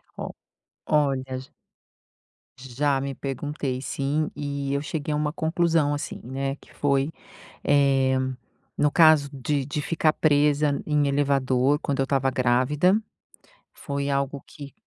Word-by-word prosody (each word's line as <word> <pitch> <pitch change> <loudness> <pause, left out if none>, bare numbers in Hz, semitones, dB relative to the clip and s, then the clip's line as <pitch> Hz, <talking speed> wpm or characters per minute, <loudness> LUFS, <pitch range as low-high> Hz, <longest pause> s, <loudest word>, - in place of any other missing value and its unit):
Ó, - - -5 0.6
olha, 140 -3 +2
j 130 +1 -10 1.1
Já 135 +2 -1
me 140 0 -3
perguntei 135 -1 -4
sim, 145 +3 -1
e 140 -1 -3
eu 140 - 0
cheguei 150 0 -3
a - - 0
uma 150 0 -1
conclusão, 165 -3 +1
assim, 145 0 -5
né, 135 +2 -3
que - - -21
foi, 140 +1 +1 0.5
eh, 135 -2 +3 0.6
no 150 - +3
caso 155 -4 +5
de 140 0 -1
de 145 +1 -3
ficar 160 -1 +1
presa 145 -1 +2
em 150 -1 +2
elevador 140 -1 +2
quando 140 -1 -2
eu - - +4
estava 135 -1 +1
grávida, 130 +9 +2 0.8
foi 140 -1 -3
algo 140 0 -1
que 140 -2 -11
140 Hz, 135 wpm, -25 LUFS, 135-150 Hz, 1.1 s, caso